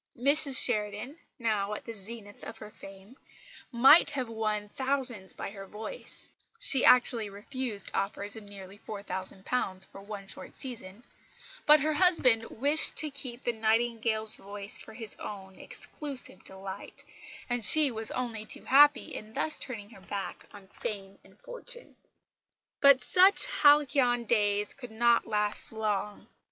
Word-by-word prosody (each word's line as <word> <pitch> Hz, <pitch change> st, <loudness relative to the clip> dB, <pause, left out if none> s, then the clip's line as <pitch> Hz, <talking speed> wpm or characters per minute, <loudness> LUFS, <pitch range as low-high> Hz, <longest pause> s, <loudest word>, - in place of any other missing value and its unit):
Mrs 275 Hz, +1 st, +3 dB
Sheridan, 210 Hz, +3 st, 0 dB, 0.2 s
now 210 Hz, -3 st, -1 dB
at -, -, -9 dB
the 230 Hz, -, -7 dB
zenith 205 Hz, 0 st, -10 dB
of 225 Hz, -, -8 dB
her 210 Hz, -, -11 dB
fame, 195 Hz, +6 st, -14 dB, 0.5 s
might 270 Hz, +6 st, +6 dB
have 265 Hz, -5 st, -4 dB
won 215 Hz, -2 st, -2 dB
thousands 260 Hz, -7 st, 0 dB
by -, -, -7 dB
her 195 Hz, -1 st, -10 dB
voice 220 Hz, -, -6 dB, 0.3 s
she 270 Hz, -, +3 dB
actually 240 Hz, -4 st, +4 dB
refused 210 Hz, +1 st, -1 dB
offers 200 Hz, +1 st, -1 dB
of 220 Hz, -, -7 dB
nearly 200 Hz, -1 st, -11 dB
£4000 190 Hz, 0 st, -4 dB
for 195 Hz, -, -13 dB
one 200 Hz, -1 st, -8 dB
short -, -, -6 dB
season 230 Hz, -4 st, -8 dB, 0.6 s
but 300 Hz, 0 st, +8 dB
her 310 Hz, +2 st, +1 dB
husband 280 Hz, -10 st, +3 dB
wished 285 Hz, +6 st, 0 dB
to 305 Hz, -1 st, 0 dB
keep 260 Hz, -3 st, -5 dB
the 240 Hz, -, 0 dB
Nightingale's 220 Hz, -1 st, 0 dB
voice 200 Hz, 0 st, -7 dB
for 220 Hz, -, -9 dB
his 225 Hz, -2 st, -6 dB
own 190 Hz, -2 st, -9 dB
exclusive 275 Hz, -10 st, -8 dB
delight; 190 Hz, +1 st, -9 dB, 0.4 s
and 245 Hz, -1 st, -2 dB
she 300 Hz, +3 st, +5 dB
was 220 Hz, -1 st, -1 dB
only 235 Hz, -4 st, -3 dB
too 215 Hz, -, -5 dB
happy 290 Hz, +1 st, +5 dB
in 215 Hz, +1 st, -9 dB
thus 310 Hz, -, 0 dB
turning 215 Hz, -5 st, -7 dB
her 195 Hz, -, -15 dB
back 200 Hz, +1 st, -6 dB
on 200 Hz, -2 st, -14 dB
fame 195 Hz, -2 st, -7 dB
and -, -, -21 dB
fortune. -, -, -10 dB, 0.8 s
But 280 Hz, -2 st, +6 dB
such 380 Hz, +2 st, +5 dB
halcyon 280 Hz, -4 st, +3 dB
days 205 Hz, -2 st, +1 dB
could 250 Hz, -3 st, -10 dB
not 235 Hz, +1 st, +2 dB
last 210 Hz, -1 st, 0 dB
long. 210 Hz, -2 st, -3 dB
225 Hz, 145 wpm, -29 LUFS, 205-260 Hz, 0.8 s, but